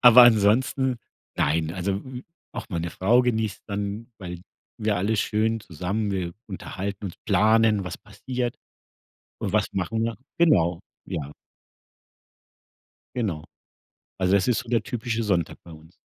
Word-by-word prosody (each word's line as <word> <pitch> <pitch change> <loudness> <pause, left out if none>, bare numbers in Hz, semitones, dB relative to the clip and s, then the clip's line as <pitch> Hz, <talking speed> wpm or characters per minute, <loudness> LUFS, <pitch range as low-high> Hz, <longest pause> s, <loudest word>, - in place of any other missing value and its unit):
Aber 125 0 +10
ansonsten 120 +3 +4 0.4
nein, 80 0 +1
also 95 +1 -1
hm, 125 +5 -6 0.3
auch - - -5
meine 85 -3 -2
Frau 115 +9 +4
genießt 110 -4 -1
dann, 105 +3 -4
weil 90 -3 -7 0.4
wir 105 -1 +1
alle 105 +5 +1
schön 110 +2 +1
zusammen 100 +5 -2
wir 90 -3 -2
unterhalten 100 0 -5
uns, 90 - -6
planen, 110 -2 +4
was 90 - -5
passiert 120 +3 -4 0.8
und - - -3
was - - +3
machen 95 +4 -1
wir? 115 0 -2 0.2
Genau, 85 - +4 0.2
ja. 75 -2 -4 1.9
Genau. 95 -11 -1 0.7
Also, 95 0 +2
da 100 - +7
ist 95 - 0
so 125 - -6
der 115 -3 +2
typische 115 0 -2
Sonntag 90 -6 0
bei 85 - -13
uns. 80 +2 -14
105 Hz, 140 wpm, -25 LUFS, 90-115 Hz, 1.9 s, Aber